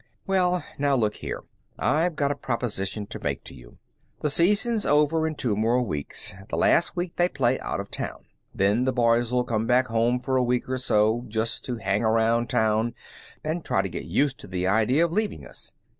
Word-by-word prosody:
"Well 180 Hz, -2 st, +2 dB, 0.2 s
now, 140 Hz, -1 st, +3 dB
look 110 Hz, -4 st, 0 dB
here. -, -, -5 dB, 0.3 s
I've 155 Hz, -, +1 dB
got 140 Hz, -2 st, +1 dB
a -, -, -1 dB
proposition 110 Hz, -6 st, -3 dB
to -, -, -7 dB
make -, -, -3 dB
to -, -, -9 dB
you. -, -, -15 dB, 0.4 s
The 150 Hz, -, +1 dB
season's 210 Hz, -, +2 dB
over 150 Hz, +2 st, +3 dB
in 155 Hz, -, -3 dB
two 120 Hz, -7 st, -1 dB
more 115 Hz, +4 st, +2 dB
weeks. 75 Hz, -11 st, -2 dB, 0.2 s
The -, -, -2 dB
last 170 Hz, -, +3 dB
week 175 Hz, -1 st, -3 dB
they 175 Hz, 0 st, +3 dB
play 130 Hz, -4 st, +1 dB
out -, -, -3 dB
of -, -, -6 dB
town. -, -, -5 dB, 0.3 s
Then 100 Hz, +6 st, +2 dB
the 130 Hz, -, +1 dB
boys'll 120 Hz, +1 st, +2 dB
come 115 Hz, -2 st, -1 dB
back 125 Hz, +1 st, +3 dB
for 120 Hz, +3 st, +1 dB
a 130 Hz, -, +3 dB
week 125 Hz, 0 st, 0 dB
or 130 Hz, 0 st, -2 dB
so, 110 Hz, 0 st, +2 dB
just 110 Hz, +1 st, -2 dB
to 125 Hz, -, -2 dB
hang 100 Hz, 0 st, -1 dB
around 115 Hz, +1 st, +2 dB
town 110 Hz, +1 st, +1 dB, 0.5 s
and 160 Hz, +2 st, -2 dB
try 95 Hz, -, +1 dB
to 95 Hz, -, -3 dB
get 85 Hz, -, -6 dB
used 135 Hz, -, 0 dB
to -, -, -11 dB
the 90 Hz, 0 st, -2 dB
idea 115 Hz, -, +3 dB
of 170 Hz, -, -3 dB
leaving 215 Hz, +2 st, -1 dB
us. -, -, -7 dB
125 Hz, 200 wpm, -25 LUFS, 110-145 Hz, 0.5 s, now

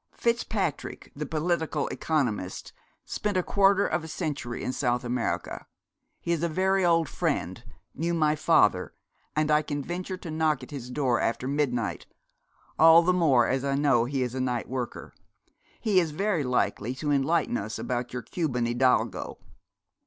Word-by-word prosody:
Fitzpatrick, 225 Hz, -, -2 dB
the 150 Hz, 0 st, -4 dB
political 160 Hz, -1 st, -1 dB
economist, 120 Hz, -, -2 dB, 0.3 s
spent 205 Hz, -2 st, -2 dB
a 180 Hz, -, +2 dB
quarter 200 Hz, +1 st, +3 dB
of 170 Hz, -, -1 dB
a -, -, -7 dB
century 150 Hz, -7 st, -4 dB
in 130 Hz, -, -2 dB
South 125 Hz, -2 st, 0 dB
America. 125 Hz, +1 st, -3 dB, 0.5 s
He 170 Hz, -, -3 dB
is 170 Hz, -2 st, 0 dB
a 170 Hz, -, 0 dB
very 190 Hz, +3 st, +1 dB
old 165 Hz, -2 st, +3 dB
friend -, -, -2 dB, 0.3 s
knew 170 Hz, +3 st, -1 dB
my 155 Hz, -2 st, +2 dB
father 105 Hz, -, +3 dB, 0.4 s
and 155 Hz, 0 st, +1 dB
I 150 Hz, 0 st, +5 dB
can 145 Hz, -2 st, -4 dB
venture 180 Hz, +4 st, -4 dB
to 175 Hz, -3 st, -8 dB
knock 155 Hz, -4 st, +1 dB
at 125 Hz, -, -11 dB
his 130 Hz, -4 st, -7 dB
door 125 Hz, -2 st, +1 dB
after 115 Hz, +3 st, -1 dB
midnight 135 Hz, -6 st, -1 dB, 0.7 s
all 165 Hz, +1 st, +8 dB
the 180 Hz, +2 st, +3 dB
more 140 Hz, -10 st, +4 dB
as 130 Hz, 0 st, 0 dB
I 140 Hz, 0 st, 0 dB
know 140 Hz, -5 st, +3 dB
he 135 Hz, +1 st, -1 dB
is 125 Hz, -1 st, -3 dB
a 130 Hz, -, -2 dB
night 125 Hz, -2 st, -1 dB
worker. 125 Hz, -2 st, -5 dB, 0.7 s
He 205 Hz, -4 st, +3 dB
is 170 Hz, -3 st, 0 dB
very 180 Hz, +1 st, 0 dB
likely 125 Hz, -2 st, 0 dB
to 150 Hz, +2 st, -2 dB
enlighten 145 Hz, 0 st, +1 dB
us 110 Hz, 0 st, -3 dB
about 125 Hz, -1 st, -3 dB
your 125 Hz, -1 st, -5 dB
Cuban 130 Hz, -9 st, -1 dB
hidalgo.' 120 Hz, -4 st, +1 dB
150 Hz, 165 wpm, -27 LUFS, 125-170 Hz, 0.7 s, all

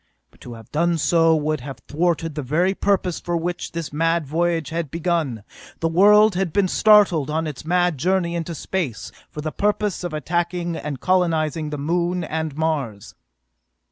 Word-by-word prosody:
But -, -, -26 dB
to 120 Hz, -, -9 dB
have 115 Hz, -1 st, -13 dB
done 170 Hz, +2 st, +1 dB
so 165 Hz, 0 st, +3 dB
would 155 Hz, 0 st, -1 dB
have 135 Hz, +1 st, -7 dB
thwarted 165 Hz, 0 st, 0 dB
the 150 Hz, -, -4 dB
very 165 Hz, +8 st, +1 dB
purpose 190 Hz, -3 st, 0 dB
for 175 Hz, -1 st, -2 dB
which 175 Hz, +1 st, -4 dB
this 165 Hz, -3 st, -5 dB
mad 165 Hz, +1 st, +1 dB
voyage 165 Hz, +1 st, 0 dB
had 165 Hz, -2 st, -3 dB
been 165 Hz, -, -5 dB
begun. 155 Hz, -, -1 dB, 0.4 s
The 165 Hz, -, 0 dB
world 210 Hz, +5 st, +6 dB
had 180 Hz, -2 st, -1 dB
been 195 Hz, +3 st, +2 dB
started 205 Hz, -10 st, +4 dB
on 160 Hz, +2 st, -1 dB
its 150 Hz, -1 st, -6 dB
mad 175 Hz, -3 st, +1 dB
journey 180 Hz, +2 st, +1 dB
into 170 Hz, 0 st, -4 dB
space 155 Hz, -, -4 dB, 0.2 s
for 150 Hz, -, -7 dB
the 155 Hz, 0 st, -3 dB
purpose 210 Hz, -1 st, -1 dB
of 175 Hz, -, -3 dB
attacking 170 Hz, +3 st, -2 dB
and 150 Hz, -4 st, -5 dB
colonizing 160 Hz, -4 st, +1 dB
the 150 Hz, -, -4 dB
Moon 175 Hz, +4 st, -1 dB
and 160 Hz, -2 st, -4 dB
Mars. 140 Hz, -11 st, -2 dB
165 Hz, 175 wpm, -22 LUFS, 150-175 Hz, 0.4 s, world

